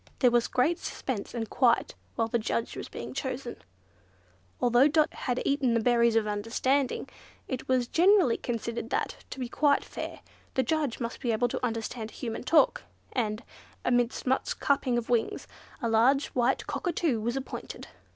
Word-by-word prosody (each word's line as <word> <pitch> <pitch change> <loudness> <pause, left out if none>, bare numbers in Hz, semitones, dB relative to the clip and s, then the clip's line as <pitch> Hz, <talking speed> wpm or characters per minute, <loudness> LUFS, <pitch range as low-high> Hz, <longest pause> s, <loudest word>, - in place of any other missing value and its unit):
There 250 -3 +4
was 240 -1 +3
great 315 +7 +1
suspense 245 -3 -4
and 225 -2 -2
quiet 240 +1 +2 0.2
while 225 - +1
the 235 +1 0
Judge 225 +1 -2
was - - -6
being - - -7
chosen. 260 -3 -4 1.0
Although 245 +3 +5
Dot 305 0 +2
had 250 -1 -2
eaten 275 -4 +2
the - - +3
berries 235 0 +3
of 225 -1 +3
understanding, 230 +6 0 0.4
it 260 -2 -4
was 255 -2 +2
generally 360 - +4
considered 235 -1 -4
that, - - -1
to - - -7
be 250 - -2
quite 285 +3 +2
fair, - - -7 0.3
the 260 - +3
judge 295 -2 -1
must 235 -1 -4
be 240 - 0
able 240 +2 +1
to - - -4
understand 230 -1 -3
human 230 0 -5
talk; 305 +5 +4 0.3
and, 220 -3 -1 0.4
amidst 245 -1 +1
much 260 +1 0
clapping 265 -3 +1
of 240 0 -3
wings, 235 -2 0 0.4
a - - +2
large 245 +5 +3
white 250 +1 +1
Cockatoo 335 - -1
was 235 +4 -1
appointed. 270 - -6
245 Hz, 165 wpm, -28 LUFS, 230-270 Hz, 1.0 s, Although